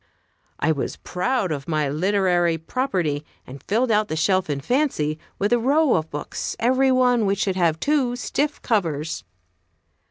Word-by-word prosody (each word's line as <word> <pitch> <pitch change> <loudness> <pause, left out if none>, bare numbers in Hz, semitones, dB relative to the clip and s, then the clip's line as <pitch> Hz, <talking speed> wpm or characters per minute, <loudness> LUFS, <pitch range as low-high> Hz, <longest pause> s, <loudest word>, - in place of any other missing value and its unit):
I 160 - +2
was 145 -4 -2
proud 200 0 -1
of 140 -3 -4
my 155 -3 0
literary 175 +1 +1
property, 165 - -2 0.2
and 135 +1 -10
filled 230 - 0
out 210 0 +2
the 155 - -3
shelf 185 +2 +1
in 145 -1 -1
fancy 155 - 0 0.2
with 205 +3 +1
a 240 - +4
row 285 +4 +3
of 160 0 0
books, 145 - -5
every 260 +3 +3
one 250 -2 +3
of - - +1
which 200 +1 +1
should 190 -2 0
have 165 -4 +1
two 275 -5 +1
stiff 290 +4 -2
covers. 160 - -1
190 Hz, 165 wpm, -23 LUFS, 155-250 Hz, 0.2 s, a